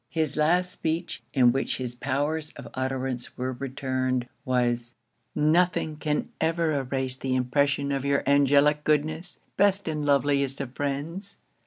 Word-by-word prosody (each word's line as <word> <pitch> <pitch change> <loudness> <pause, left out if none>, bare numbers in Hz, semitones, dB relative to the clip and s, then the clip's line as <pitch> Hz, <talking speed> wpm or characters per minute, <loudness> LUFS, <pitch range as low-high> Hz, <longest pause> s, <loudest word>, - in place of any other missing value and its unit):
His 160 -4 0
last 175 +4 +2
speech, 165 +1 -3
in 125 -3 +5
which 135 +2 -1
his 125 -2 -4
powers 145 +5 -1
of 140 - -9
utterance 130 -1 -3
were 130 +1 -2
returned, 130 -1 -2 0.2
was 120 -2 0 0.4
'Nothing 160 +1 +2
can 150 -1 -1
ever 165 0 +1
erase 130 -2 -1
the 130 -1 -1
impression 140 +2 +1
of 135 -1 -1
your 140 0 +1
angelic 145 +1 +4
goodness, 155 +3 0 0.2
best 200 -1 +3
and 155 -2 -2
loveliest 140 -1 +2
of 135 -2 -5
friends! 150 +9 -4
140 Hz, 140 wpm, -26 LUFS, 130-155 Hz, 0.4 s, in